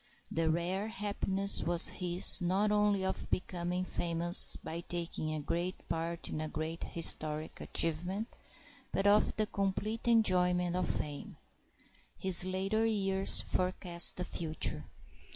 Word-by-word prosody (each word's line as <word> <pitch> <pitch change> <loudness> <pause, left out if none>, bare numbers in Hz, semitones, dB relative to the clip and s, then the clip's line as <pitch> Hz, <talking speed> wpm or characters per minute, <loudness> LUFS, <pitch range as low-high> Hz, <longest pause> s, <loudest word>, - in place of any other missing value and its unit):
The 165 0 -1
rare 180 +5 -2
happiness 200 -3 +1
was 175 0 +6
his 180 +1 +3
not 190 +4 0
only 205 -2 +1
of 190 - -4
becoming 180 0 -3
famous 170 0 +3
by 165 - -8
taking 170 -2 -5
a 155 - -4
great 170 +5 -5
part 165 0 -4
in 155 - -5
a 155 - -5
great 160 +2 -6
historic 155 -2 0
achievement, 175 +7 -3 0.6
but 195 - -2
of 205 +1 +3
the 215 - 0
complete 210 +3 -4
enjoyment 180 -6 +2
of 180 -1 -2
fame. 145 -1 -6 0.8
His 190 -2 +3
later 195 +4 -2
years 195 -3 +2
forecast 180 -1 +3
the 180 - -3
future. 155 - -3
180 Hz, 130 wpm, -31 LUFS, 170-195 Hz, 0.8 s, was